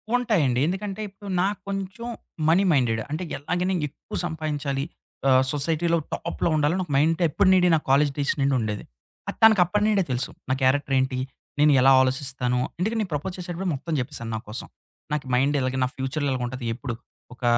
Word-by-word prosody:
ఉంటాయండి. 175 - +2
ఎందుకంటే 195 +3 -3
ఇప్పుడు 195 +1 -11
నాకు 200 +2 0
కొంచెం 195 +4 -4 0.4
మనీ 180 +4 +4
మైండెడ్. 120 -6 +2
అంటే 165 +4 -2 0.2
ఎలాగైనా 180 +6 -1 0.2
ఎక్కువ - - -8
సంపాదించాలి 150 -4 -2 0.5
ఆహ్, 130 0 +5
సొసైటీలో 165 +3 +1 0.2
టాప్‌లో 170 0 -2
ఉండాలి. 150 +2 +2
నాకు 175 -5 -4
మైండ్ 160 +4 +2
ఎప్పటి 185 +5 +2
నుండి 180 -1 +5
నా - - +2
కాలేజి 140 +1 +4
డేస్ 145 -1 +1
నుండి 135 0 +2
ఉండేది. 105 -2 -3 0.4
అది - - -4
తనకు 220 -4 +7
అప్పటి 205 +4 0
నుండే 205 -3 +3
తెలుసు. 125 0 -1 0.2
నా - - +3
క్యారెక్టర్ 135 +1 +2
ఏంటి? 130 0 0 0.4
నేను 150 0 +6
ఎలా 135 - +6
ఆలోచిస్తాను? 130 -1 0 0.2
ఎందుకంటే, 220 +5 0
నేను 190 -6 -4
ప్రపోజ్ 180 +6 -3
చేసేటప్పుడే 180 +1 -4
మొత్తం 155 +4 -4
చెప్పేసాను 115 -2 -5
నా - - -2
కోసం. 110 - -5 0.4
నాకు 150 -1 -1
మైండ్ 140 +3 +2
ఇలాగె, 130 0 -1
నా - - +2
ఫ్యూచర్‌లో 140 +2 -2
ఇలాగుంటది. 125 0 -3
ఎప్పుడు 120 0 -5 0.4
ఒక 125 - -17
150 Hz, 175 wpm, -25 LUFS, 130-180 Hz, 0.5 s, తనకు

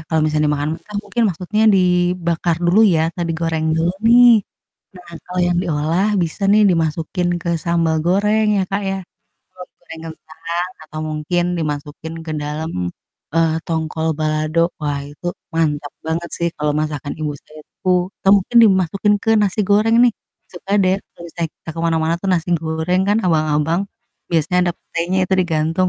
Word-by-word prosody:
Kalau 160 -1 +1
misalnya 155 0 +1
dimakan 150 +1 -1
mentah 210 - -15
mungkin 235 +3 -2
maksudnya 190 +5 -1
dibakar 180 -3 +2
dulu 180 +6 +4
ya 160 - +2
atau 175 - -4
digoreng 160 -1 -1
dulu 170 +2 +1
nih. 240 -2 +7 0.6
Nah 180 -1 -13
kalau 180 0 -4
yang 175 0 +1
diolah 160 +5 0
bisa 170 +4 -4
nih 215 +1 +5
dimasukin 165 +1 -1
ke 170 - -3
sambal 170 -2 +1
goreng 210 +4 +2
ya - - +2
Kak, 200 +1 -1
ya, 195 - -2 0.6
atau 180 0 -9
goreng 165 -2 -11
kentang 170 +3 -5
atau 155 0 -9
mungkin 155 +3 -1
dimasukin 150 +1 -5
ke 155 - -3
dalam, 155 +2 -4 0.6
eee, 165 -1 +2
tongkol 160 0 -2
balado, 155 +1 0 0.2
wah 145 -1 -1
itu 145 +4 -10 0.3
mantap 150 -3 -1
banget 165 +2 -2
sih 170 0 -1
kalau 150 0 0
masakan 150 -2 -3
ibu 155 -2 -3
saya 155 0 -15 0.3
tuh, 180 0 +2
atau 195 - +2
mungkin 240 - -4
dimasukin 195 +1 +2
ke 225 - +1
nasi 205 0 +1
goreng 210 +3 +3
nih, 240 - +4 0.4
suka 190 +2 -7
deh 185 +1 +2 0.2
kalau - - -13
misalnya 165 -1 -4
kita 165 - -10
ke - - -3
mana-mana 165 0 +1
tuh 195 - -5
nasi 175 0 0
goreng 160 +3 -1
kan, 205 - +3
abang-abang 155 0 +1 0.5
biasanya 170 +2 +1
ada - - 0
petenya 175 +3 -3
itu 190 - 0
digantung. 165 +1 0
170 Hz, 165 wpm, -19 LUFS, 155-185 Hz, 0.6 s, nih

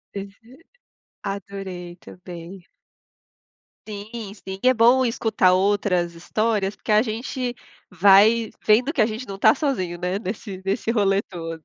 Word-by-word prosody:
Aham. 200 0 -6 0.9
Adorei 195 -3 -6
também. 180 +1 -11 1.2
Sim, 210 0 -7
sim, 190 -1 -8
é 255 0 +5
bom 245 +3 +5
escutar 220 -6 +2
outras 185 -3 +1
histórias, 210 +3 -1
porque - - -5
a 210 +1 +6
gente 245 +2 -3 0.3
vai 205 +5 +5 0.2
vendo 245 +8 +4
que 260 - +1
a 215 - +4
gente 225 +3 -5
não 195 0 -7
tá 220 0 +6
sozinho, 185 - -2
né, 180 +3 -2
nesse 195 -2 -6
nesse 205 +4 -1
rolê 200 -3 +2
todo. 165 -2 -8
200 Hz, 135 wpm, -23 LUFS, 185-225 Hz, 1.2 s, a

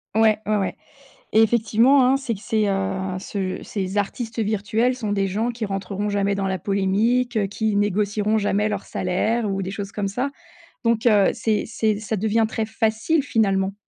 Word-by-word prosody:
Ouais, 220 -1 +4
ouais, 215 0 +1
ouais 195 -2 -1 0.6
et 220 - +6
effectivement, 235 +4 +4
hein, 260 +2 +4
c'est 265 -4 -3
que 195 - -11
ces, 215 0 0
heu, 195 -1 0 0.3
ce 190 -1 -4
ces 195 0 -3
artistes 225 +3 -3
virtuels 220 +4 0
sont 215 -5 -3
des 195 -1 +1
gens 220 +5 -1
qui 230 -1 -4
rentreront 195 +1 -3
jamais 200 -1 +1
dans 195 -1 -1
la 190 - -1
polémique, 205 +4 +1
qui 215 +1 -1
négocieront 205 +1 +1
jamais 210 0 +1
leurs 205 -2 -3
salaires 210 +5 -1
ou 195 0 -2
des 185 - -4
choses 200 +1 -6
comme 205 -2 -2
ça, 250 +8 -2 0.5
donc 230 +1 +2
heu, 205 -4 +5
c'est 220 -2 0
c'est 220 -2 0
ça 220 0 -3
devient 220 +2 +1
très 220 0 -2
facile, 225 +8 0
finalement. 195 -6 +1
210 Hz, 180 wpm, -23 LUFS, 195-225 Hz, 0.6 s, et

